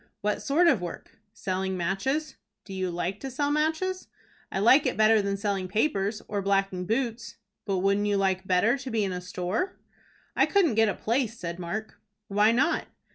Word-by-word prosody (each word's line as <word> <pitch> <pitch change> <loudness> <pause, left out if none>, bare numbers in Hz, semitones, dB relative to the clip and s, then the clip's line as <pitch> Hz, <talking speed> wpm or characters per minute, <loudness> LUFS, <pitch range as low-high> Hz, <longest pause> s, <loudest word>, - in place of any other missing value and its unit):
"What 210 0 -1
sort 330 +5 +3
of 265 - +4
work?" 175 +4 -8
"Selling 190 -1 -3
matches." 255 - -1 0.3
"Do 195 - -9
you 185 -1 -2
like 175 +3 -3
to 270 - -5
sell 285 +3 -1
matches?" 320 +5 0 0.4
"I - - -2
like 235 +8 +5
it - - -2
better 215 0 +5
than 200 0 -1
selling 195 -2 -2
papers, 210 0 0
or 205 -1 -2
blacking 195 -2 0
boots." 235 +1 -2 0.3
"But 195 -2 0
wouldn't 200 +2 +2
you 205 -1 +2
like 190 -1 0
better 215 +8 +3
to 265 -1 -6
be 225 -3 0
in 195 - -1
a 180 0 -4
store?" 180 - -3 0.6
"I - - +4
couldn't 370 - +3
get 225 0 +4
a - - -2
place," 230 0 -1
said 170 -2 -5
Mark. 215 +5 -5 0.3
"Why 210 +2 +4
not?" 270 +9 +1
210 Hz, 185 wpm, -27 LUFS, 190-255 Hz, 0.6 s, like